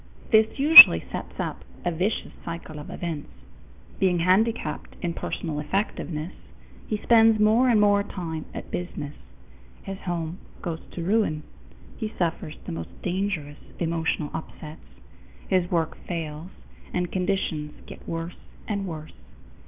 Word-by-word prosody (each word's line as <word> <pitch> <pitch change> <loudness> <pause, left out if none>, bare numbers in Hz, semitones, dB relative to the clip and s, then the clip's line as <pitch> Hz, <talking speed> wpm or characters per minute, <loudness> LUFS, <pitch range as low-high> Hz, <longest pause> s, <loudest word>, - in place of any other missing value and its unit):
This 220 -1 +4
usually 305 +4 +11
sets - - -7
up - - -4 0.2
a 175 - +1
vicious 185 +6 -2
circle 165 -2 -7
of 150 - -9
events. 165 -4 -5 0.7
Being 185 -2 +3
handicapped 190 +7 0
in 170 -1 -1
personal 160 -2 -4
effectiveness, 160 -1 -3 0.5
he 215 - -1
spends 225 0 +5
more 220 +4 +4
and 225 -3 +4
more 205 -1 +4
time 170 -6 -5
at - - -8
business. 150 -5 -5 0.7
His 195 0 -6
home 175 0 -4 0.2
goes 165 -3 -4
to 170 - -5
ruin; 185 -6 +1 0.5
he 220 -3 -4
suffers 165 -3 -2
the - - -5
most 165 - -7
dangerous 180 -6 -2 0.2
emotional 165 -2 -1
upsets; 155 -1 -8 0.7
his 180 -2 +1
work 165 -3 0
fails, 165 -1 -5 0.4
and 180 -1 -2
conditions 180 -5 -2
get - - -11
worse 165 +1 -5 0.3
and 200 -2 -2
worse. 155 -2 -7
175 Hz, 130 wpm, -25 LUFS, 160-200 Hz, 0.7 s, usually